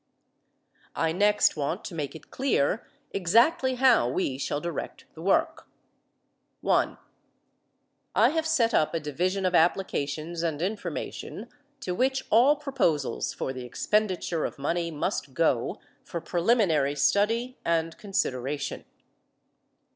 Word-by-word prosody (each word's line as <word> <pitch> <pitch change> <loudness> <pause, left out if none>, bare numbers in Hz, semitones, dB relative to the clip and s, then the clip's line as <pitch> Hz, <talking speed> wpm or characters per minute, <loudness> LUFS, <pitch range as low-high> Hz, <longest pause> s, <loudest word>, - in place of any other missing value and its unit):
I 165 -1 +1
next 205 +4 +3
want 155 +5 -3
to - - -6
make 145 -3 -4
it 160 - -13
clear 230 - 0 0.2
exactly 235 - +3
how 250 - +4
we 130 -2 -1
shall 145 - -1
direct 170 +1 -5
the 160 - -11
work. 190 +3 +1 0.9
(1) - - +1 1.2
I - - +5
have 320 0 -1
set 235 -7 +2
up 155 -1 +2
a - - +1
Division 180 +6 -1
of 185 - +1
Applications 165 -2 0
and 160 -3 -1
Information 200 +5 -4 0.3
to 180 - -3
which 265 +6 +1
all 250 +7 +6
proposals 250 - -1
for 130 - -4
the 130 -1 -7
expenditure 180 - 0
of - - -4
money 170 +4 -1
must 145 -3 -3
go 140 -8 +1 0.2
for 170 - -5
preliminary 170 - +2
study 225 - +1
and 165 -1 0
consideration. 145 - -2
175 Hz, 125 wpm, -27 LUFS, 150-220 Hz, 1.2 s, all